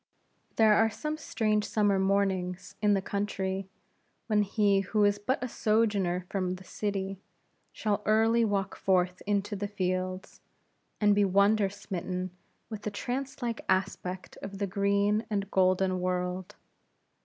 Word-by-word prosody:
There 220 -1 +6
are 225 +1 +4
some 300 +8 -4
strange 215 -8 0
summer 205 -2 +2
mornings 190 -2 0
in 210 -1 +4
the 195 - -1
country, 195 -1 -2 0.6
when 210 -2 +2
he 205 -1 +2
who 205 +2 +1
is 205 0 +3
but 255 +5 -1
a - - -1
sojourner 205 -6 +1
from 185 -2 -1
the 185 - -12
city 195 -1 -3 0.5
shall 210 -1 -1
early 225 +2 +4
walk 200 -2 0
forth 180 -1 +1
into 205 0 0
the 205 +1 -3
fields, 185 -1 -3 0.6
and 205 -1 +5
be 205 0 +3
wonder 200 +1 +3
smitten 185 -2 -4 0.4
with 215 -2 -7
the 210 - -3
trance 255 +6 -4
like 235 -1 -2
aspect 185 -1 -1
of 195 0 -6
the 200 - -1
green 200 +2 +1
and 200 -2 -2
golden 185 0 +2
world. 180 0 -2
200 Hz, 145 wpm, -29 LUFS, 185-210 Hz, 0.6 s, There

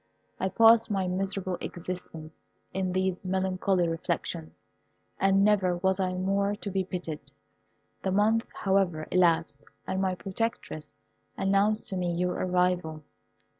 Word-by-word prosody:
I 190 - 0
passed 225 +3 +6
my 195 -3 0
miserable 190 0 -2
existence 165 -3 -7 0.4
in 190 -1 -1
these 185 0 0
melancholy 185 -1 +1
reflections, 120 - -3 0.7
and 195 +1 +4
never 190 -4 +3
was 190 +2 +1
I 185 -1 0
more 200 +2 0
to 205 -1 -5
be 190 0 0
pitied. 160 -6 -6 0.7
The 190 - -1
month, 215 +4 +2
however, 190 -5 0
elapsed, 165 -5 +2 0.2
and 190 - -2
my 190 -1 0
protectress 195 -5 -4 0.4
announced 200 +3 +2
to 190 - -3
me 175 -1 -1
your 180 +1 0
arrival. 180 -4 0
185 Hz, 130 wpm, -28 LUFS, 180-195 Hz, 0.7 s, passed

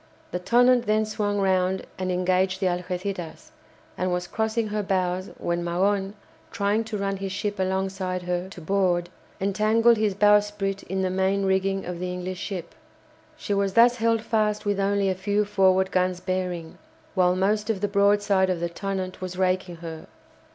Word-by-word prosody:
The 180 - -2
"Tonnant" 245 +4 +4
then 215 +1 +2
swung 210 -1 -1
round 190 -1 +1
and 185 0 -1
engaged 185 +1 +1
the 195 - -1
"Algéciras," 180 -1 -3 0.4
and 185 0 -1
was 180 0 -1
crossing 220 +3 -1
her 210 0 -1
bows 185 -1 -1
when 170 0 -2
Magon, 195 +3 0 0.4
trying 210 0 0
to 220 -1 -4
run 195 0 -2
his 195 0 -4
ship 205 +1 -3
alongside 190 -1 -1
her, 180 +1 -2
to 190 - -10
board, 175 -1 +1 0.3
entangled 215 +4 +3
his 210 -2 +1
bowsprit 205 -1 +2
in 190 +1 -2
the 185 - 0
main 190 +1 +1
rigging 195 0 0
of 180 -1 -5
the 180 0 -3
English 180 0 -5
ship. 185 -4 -5 0.6
She 205 - -3
was 200 -1 0
thus 240 +2 +5
held 230 -1 +1
fast 215 -2 0
with 205 -1 0
only 200 0 +1
a 190 - +2
few 205 +3 0
forward 190 -2 +3
guns 185 -1 +1
bearing, 180 -3 -3 0.3
while 180 -2 +3
most 210 +3 0
of 215 -4 0
the 205 - +1
broadside 200 -1 +3
of 180 -2 0
the 170 0 -2
"Tonnant" 185 +1 -4
was 185 -1 -5
raking 185 -1 0
her. 160 -1 -7
190 Hz, 170 wpm, -25 LUFS, 185-205 Hz, 0.6 s, thus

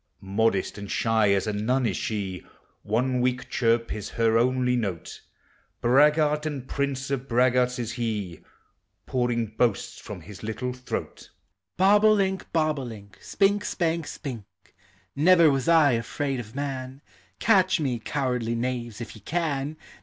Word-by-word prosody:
Modest 100 0 0
and 100 -1 -7
shy 110 -2 +2
as 100 -1 +2
a 105 - -2
nun 125 +5 0
is 100 -5 0
she, 95 -5 -3 0.4
One 125 +4 0
weak 125 0 -1
chirp 115 -1 +1
is 105 -2 -6
her 115 -1 +3
only 125 +1 +2
note, 100 -9 -4 0.6
Braggart 150 +4 +3
and 135 -4 -5
prince 140 -1 -2
of 135 -1 -2
braggarts 125 +1 +2
is 120 -2 -3
he, 105 -8 -3 0.7
Pouring 120 -2 0
boasts 120 -5 0
from - - -8
his 105 -2 -11
little 120 +3 -3
throat: 125 0 -6 0.5
Bob 200 +3 +5
o' 215 0 +7
link, 190 -2 -1
bob 155 -3 +1
o' - - -4
link, 100 -5 -10
Spink, 200 +1 +1
spank, 165 -4 -1
spink; 125 -8 -6 0.7
Never 165 +1 +6
was 135 -2 -1
I 160 -4 +6
afraid 130 +3 -2
of 110 -1 -9
man; 135 -1 -5 0.3
Catch 190 -4 +3
me, 130 -6 -1
cowardly 125 -2 -1
knaves, 120 -2 -3
if 120 - -7
you 110 - -13
can. 150 - -2
125 Hz, 150 wpm, -26 LUFS, 115-145 Hz, 0.7 s, o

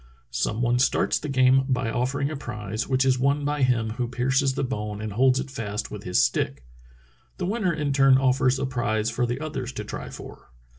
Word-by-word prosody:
Some 105 - -1
one 120 +1 +2
starts 130 - +2
the 150 - -5
game 130 0 +4
by 125 -3 0
offering 135 +4 -1
a - - -4
prize, 110 -4 -5
which 130 0 +2
is 130 -1 +2
won 140 +2 +1
by 145 0 -1
him 120 -4 +2
who 120 +2 -2
pierces 130 +2 +1
the 140 - -1
bone 105 -5 -3
and 110 -1 -5
holds 130 +3 +3
it 135 0 -5
fast 105 -4 -4
with 105 -1 -8
his 90 - +1
stick. 65 -2 -1 0.7
The 180 - -2
winner 200 -1 0
in 150 -4 -1
turn 135 -1 +5
offers 130 0 +2
a 135 - -1
prize 120 -4 -1
for 120 +1 0
the 120 +2 -3
others 145 -5 -4
to 105 - -5
try 105 - -7
for." - - -11
130 Hz, 210 wpm, -25 LUFS, 115-135 Hz, 0.7 s, turn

